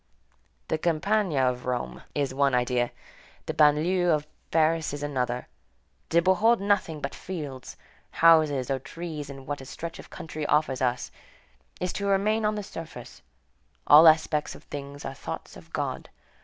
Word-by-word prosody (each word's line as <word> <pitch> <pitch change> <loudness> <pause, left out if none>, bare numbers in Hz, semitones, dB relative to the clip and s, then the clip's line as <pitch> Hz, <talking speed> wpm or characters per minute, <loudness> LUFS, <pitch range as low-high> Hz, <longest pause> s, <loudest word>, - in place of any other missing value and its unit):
The 160 - 0
campagna 170 -1 +1
of 125 0 -2
Rome 125 -1 -3
is 140 -2 0
one 140 -1 +2
idea, 125 0 +1 0.6
the - - -3
banlieue 160 +4 +3
of 150 -2 +2 0.2
Paris 160 -1 +2
is 145 - -6
another; 125 -4 -2 0.6
to 170 +1 +3
behold 210 +6 +4
nothing 195 -6 0
but 140 - -4
fields, 145 -8 -7 0.3
houses, 155 -6 +4
or 135 - 0
trees 150 +1 -7
in 135 -1 -9
what 145 0 -4
a - - -10
stretch 165 +4 -7
of - - -11
country 160 -3 -7
offers 150 -3 +1
us, 125 -1 -1 0.7
is 180 0 -2
to 200 - -2
remain 210 +3 +2
on 210 0 +1
the 210 - -4
surface; 165 -9 -9 0.6
all 155 +3 +9
aspects 155 -1 +3
of - - -14
things 140 0 -8
are 135 - -4
thoughts - - -7
of - - -14
God. - - -3
155 Hz, 155 wpm, -27 LUFS, 135-170 Hz, 0.7 s, all